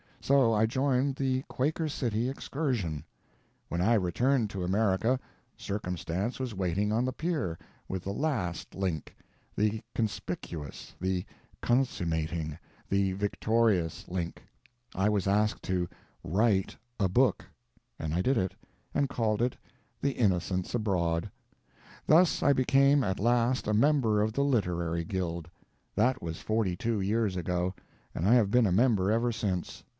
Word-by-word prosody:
So 135 -4 +4
I 110 +1 +4
joined 130 +3 +1
the 130 -1 0
"Quaker 155 +4 -1
City 120 -5 -1
Excursion." 125 - -2 0.7
When 85 - -1
I 110 +6 +4
returned 110 - +2
to 95 -2 -3
America, 105 +5 +2 0.4
Circumstance 95 +2 -3
was 125 -5 -3
waiting 95 +3 0
on 115 +3 +1
the 130 - -1
pier—with 95 - -4
the 100 - -3
_last 110 - -1
_link—the 100 +4 -3
conspicuous, 85 - -4
the 95 -1 -1 0.4
consummating, 85 - 0 0.3
the 100 -1 +1
victorious 105 -3 +1
link: 90 -2 -4 0.5
I 95 +2 +2
was 100 -2 0
asked 105 +2 +1
to 90 -1 0 0.4
write 100 +2 +1 0.2
a 95 -2 +2
book, 125 +8 +2 0.5
and 80 -1 -3
I 90 - +1
did 130 +6 +2
it, 95 -2 0 0.4
and 140 - +1
called 110 -3 0
it 125 +1 0 0.4
The 140 - +2
Innocents 95 -4 0
Abroad. 95 -5 0 0.8
Thus 165 +2 +5
I 140 - +5
became 135 +2 +4
at 95 -3 -1
last 120 +3 +2
a 105 - +1
member 115 -3 +3
of 110 +1 0
the 140 - +1
literary 85 -10 0
guild. 85 -2 -3 0.5
That 125 +5 +2
was 80 -1 -4
forty 110 -5 0
two 110 +2 -1
years 105 0 +1
ago, 90 +1 -1 0.4
and 85 - 0
I 115 - +6
have 110 -5 +4
been 125 +2 +4
a - - +1
member 105 -1 +3
ever 115 +2 +2
since. 100 -5 -3
105 Hz, 140 wpm, -29 LUFS, 90-125 Hz, 0.8 s, I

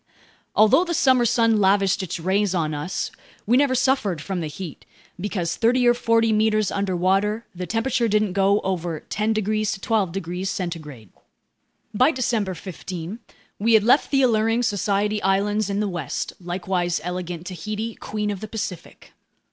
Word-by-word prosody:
Although 220 +10 +5
the 345 -2 -2
summer 260 -6 +4
sun 230 -1 +3
lavished 195 0 +3
its 180 -1 -4
rays 190 +3 +1
on 155 -3 0
us, 150 +5 -3 0.3
we 235 - +3
never 270 -1 +3
suffered 250 - +1
from 185 +4 -4
the 160 - -3
heat, 160 +1 -8 0.4
because 180 -3 -2
thirty 245 +2 +3
or 240 - +6
forty 230 -2 +2
meters 215 -1 +2
underwater, 195 +3 0
the 180 0 -6
temperature 235 +1 0
didn't 210 -2 +1
go 200 +1 +3
over 175 -4 -3
10 215 +2 -1
degrees 215 0 0
to - - -7
12 210 -4 0
degrees 180 +1 -4
centigrade. 155 - -6 0.8
By 255 +7 +4
December 225 - -1
15 180 +2 -7 0.4
we 225 +3 +2
had 220 -2 +6
left 250 +6 +4
the 270 -1 +3
alluring 225 0 +2
Society 205 0 0
Islands 205 +2 +1
in 200 +1 -1
the 210 - 0
west, 175 -7 -4
likewise 175 0 -1
elegant 180 -1 -5
Tahiti, 215 +6 -4
queen 210 -1 -3
of 200 - -5
the 215 - -6
Pacific. 215 -6 -7
205 Hz, 160 wpm, -23 LUFS, 180-225 Hz, 0.8 s, or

